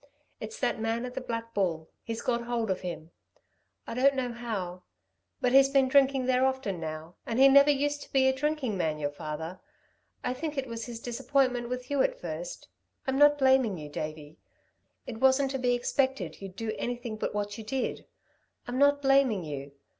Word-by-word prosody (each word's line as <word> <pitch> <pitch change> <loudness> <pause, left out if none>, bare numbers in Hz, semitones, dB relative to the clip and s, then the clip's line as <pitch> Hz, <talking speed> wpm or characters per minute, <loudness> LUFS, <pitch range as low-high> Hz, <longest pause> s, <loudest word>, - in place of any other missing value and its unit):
It's 455 +2 -7
that 220 - 0
man 225 +2 -1
at 250 - -7
the - - -4
Black 230 -2 -5
Bull. 165 -5 -1
He's 225 0 -5
got 235 -1 0
hold 235 -3 -1
of 185 - -2
him 170 -2 -6 0.7
I - - -6
don't 270 +3 +4
know 255 -2 -1
how... 200 -7 -4 0.6
but 250 -2 +1
he's 270 +1 +7
been 275 -1 +4
drinking 270 -1 +4
there 255 0 +3
often 265 -9 0
now, 160 +1 -6
and 230 - -3
he 270 +1 +8
never 280 +1 +7
used 290 0 +1
to - - -12
be 265 -1 +4
a 265 - +4
drinking 275 -4 -1
man 160 -4 0
your 145 -1 -2
father. 155 +4 -6 0.6
I 250 - 0
think 300 +3 -5
it 270 - -1
was 230 -1 -6
his 235 -2 -6
disappointment 250 0 0
with 250 +1 -5
you 285 -2 +2
at - - 0
first... - - -6 0.4
I'm 265 0 0
not 290 0 +7
blaming 265 -7 +3
you, 150 -2 -8
Davey. 155 0 -6 0.7
It 225 -3 -7
wasn't 265 +1 +4
to 270 - -2
be 245 -1 +2
expected 245 - -1
you'd 195 -2 -8
do 220 +1 -3
anything 240 -2 -3
but 215 - -3
what 205 +1 -3
you - - -6
did. 255 +4 -3 0.6
I'm 245 +1 -2
not 285 0 +4
blaming 270 -8 +4
you. 145 -2 -6
245 Hz, 195 wpm, -29 LUFS, 195-270 Hz, 0.7 s, he